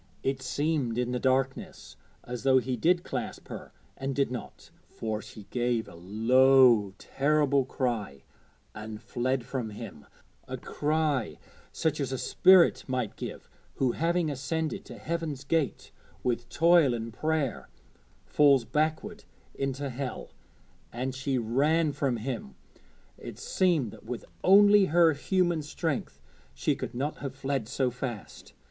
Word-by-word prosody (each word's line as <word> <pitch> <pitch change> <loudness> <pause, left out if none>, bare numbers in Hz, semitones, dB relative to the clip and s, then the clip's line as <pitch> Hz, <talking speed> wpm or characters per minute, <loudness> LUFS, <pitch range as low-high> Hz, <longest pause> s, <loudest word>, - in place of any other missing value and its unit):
It 135 0 -1
seemed 135 -2 -1
in 125 0 0
the 125 - -1
darkness 130 +1 -1 0.3
as 125 -1 -6
though 135 -1 +4
he 130 0 0
did 175 +9 +2
clasp - - -5
her - - -8 0.2
and 135 0 -4
did 140 -3 +1
not, 125 - -8 0.2
for 110 -1 -4
she 105 - -11
gave 120 -2 0
a - - -12
low 115 +3 +4
terrible 140 -1 +1
cry 115 - -3 0.5
and 110 0 -7
fled 125 +2 -2
from 125 -5 -3
him 105 -9 -9 0.4
a - - -5
cry 150 -5 -1 0.3
such 155 -2 -1
as 135 -3 -2
a 130 - -2
spirit 185 +6 +5
might 125 -5 -2
give - - -7 0.3
who, 130 -2 +1
having 165 +2 0
ascended 155 +4 -3
to - - -10
Heaven's 160 -5 -4
gate 155 0 -1 0.3
with 120 -1 -1
toil 165 -6 +4
and 115 -1 -5
prayer, 155 -1 -2 0.6
falls 140 -5 +4
backward 155 - -2 0.3
into 135 +1 -3
Hell; 125 -1 -5 0.6
and 130 +3 -3
she 135 0 -1
ran 145 +7 +2
from 135 -4 -1
him 115 - -5 0.6
it - - -9
seemed 165 - +1
that - - -14
with 120 +1 -6 0.2
only 205 +1 +7
her 165 -1 +4
human 175 +2 0
strength 150 0 -3 0.4
she 65 - 0
could - - -6
not 140 +5 -2
have 140 -2 -6
fled 135 -5 -2
so 130 -2 0
fast. 120 -4 -7
135 Hz, 140 wpm, -28 LUFS, 120-155 Hz, 0.6 s, only